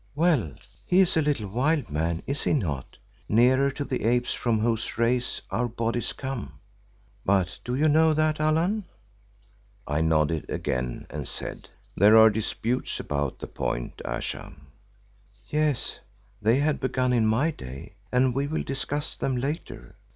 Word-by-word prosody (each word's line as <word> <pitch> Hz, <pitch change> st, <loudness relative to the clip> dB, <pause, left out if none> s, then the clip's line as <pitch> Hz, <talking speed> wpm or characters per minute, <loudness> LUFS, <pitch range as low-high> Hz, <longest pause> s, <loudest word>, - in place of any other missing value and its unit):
Well, 145 Hz, -, +2 dB, 0.3 s
he 180 Hz, -, +3 dB
is 190 Hz, -2 st, +4 dB
a 160 Hz, -, +4 dB
little 145 Hz, -8 st, 0 dB
wild 130 Hz, -, 0 dB
man, 80 Hz, +3 st, -1 dB
is 140 Hz, +1 st, -2 dB
he -, -, +2 dB
not, 75 Hz, -, -2 dB, 0.3 s
nearer 130 Hz, +5 st, +4 dB
to 140 Hz, +1 st, -4 dB
the 130 Hz, -, -3 dB
apes 120 Hz, +1 st, +2 dB
from 115 Hz, -3 st, 0 dB
whose 115 Hz, 0 st, -1 dB
race 120 Hz, +2 st, +1 dB
our 125 Hz, +1 st, 0 dB
bodies 115 Hz, 0 st, -1 dB
come? 115 Hz, -, -6 dB, 0.6 s
But 95 Hz, -2 st, +1 dB
do 125 Hz, -, -2 dB
you 150 Hz, +4 st, +3 dB
know 155 Hz, +1 st, +4 dB
that, 155 Hz, 0 st, +1 dB
Allan?" 165 Hz, +7 st, +1 dB, 1.0 s
I 75 Hz, +2 st, 0 dB
nodded 80 Hz, -1 st, +1 dB
again, 60 Hz, -1 st, -2 dB
and -, -, -5 dB
said, -, -, -6 dB, 0.3 s
"There 105 Hz, +4 st, +7 dB
are 110 Hz, 0 st, +8 dB
disputes 110 Hz, +3 st, -2 dB
upon 70 Hz, -2 st, -2 dB
the -, -, -6 dB
point, -, -, -4 dB
Ayesha." -, -, -4 dB, 1.0 s
"Yes, 150 Hz, -4 st, 0 dB, 0.4 s
they 110 Hz, +4 st, +4 dB
had 145 Hz, +1 st, +1 dB
begun 130 Hz, -1 st, 0 dB
in 115 Hz, -3 st, +3 dB
my 125 Hz, +9 st, +2 dB
day 65 Hz, -, -9 dB, 0.2 s
and 125 Hz, 0 st, +3 dB
we 140 Hz, +2 st, 0 dB
will 160 Hz, +2 st, -2 dB
discuss 145 Hz, +2 st, -3 dB
them 130 Hz, -2 st, -1 dB
later. 145 Hz, +6 st, -5 dB
125 Hz, 150 wpm, -26 LUFS, 105-145 Hz, 1.0 s, are